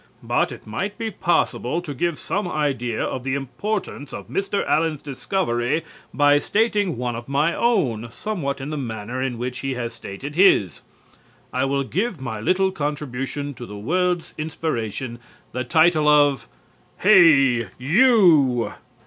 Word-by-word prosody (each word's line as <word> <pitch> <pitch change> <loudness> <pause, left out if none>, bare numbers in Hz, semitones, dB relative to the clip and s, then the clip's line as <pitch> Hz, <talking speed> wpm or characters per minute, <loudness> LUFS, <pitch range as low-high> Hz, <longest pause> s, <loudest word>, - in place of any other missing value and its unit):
But - - +1
it - - -10
might 190 - -4
be 225 -1 -3
possible 170 -5 0
to 165 -5 -6
give 170 +3 -1
some 200 -1 -2
idea 135 -8 -1
of 130 - -3
the 130 0 -1
importance 145 - -4
of - - -8
Mr. 200 +1 -1
Allen's 155 -2 +1
discovery 145 -1 -1 0.3
by 145 0 +4
stating 205 - +1
one 120 -1 -2
of 120 +1 -7
my 150 +5 +2
own, 130 - +1
somewhat 140 - -3
in 135 +3 -5
the 155 - -3
manner 115 0 -4
in 130 -2 -2
which 125 +1 -4
he 135 -1 -3
has 120 -2 -4
stated 115 +6 -8
his. 150 - +4 0.7
I 130 +1 +1
will 140 0 0
give 190 - -2
my 125 -5 -5
little 190 - +2
contribution 145 -3 -4
to 120 -2 -9
the 105 - -8
world's 175 - -1
inspiration 130 -6 -3 0.3
the 125 - -3
title 160 +3 +3
of 145 -6 +4 0.6
HEY, 140 - +6
YOU! 155 - +4
145 Hz, 150 wpm, -22 LUFS, 125-175 Hz, 0.7 s, HEY